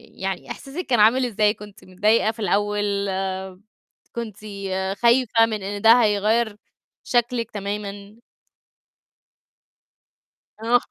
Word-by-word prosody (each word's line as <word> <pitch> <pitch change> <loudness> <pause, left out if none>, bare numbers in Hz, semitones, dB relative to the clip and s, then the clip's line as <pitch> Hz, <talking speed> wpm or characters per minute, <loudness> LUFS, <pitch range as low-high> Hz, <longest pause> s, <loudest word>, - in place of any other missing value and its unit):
يعني 190 -1 -4
إحساسِك 305 +6 -6
كان 240 -4 +1
عامل 245 +5 +5
إزاي؟ 210 -2 +2
كنتِ 210 -1 -13
متضايقة 210 +4 +2
في 225 - -17
الأول؟ 205 0 0 1.3
كنتِ 225 -4 -5 0.6
خايفة 235 -1 +4
من 215 -3 -4
إن 205 +1 -4
ده 230 +3 +7
هيغيّر 215 +1 +1 0.5
شكلِك 240 -1 0
تمامًا؟ 200 0 -6 2.5
آه. 240 +1 +3
215 Hz, 100 wpm, -23 LUFS, 205-235 Hz, 2.5 s, ده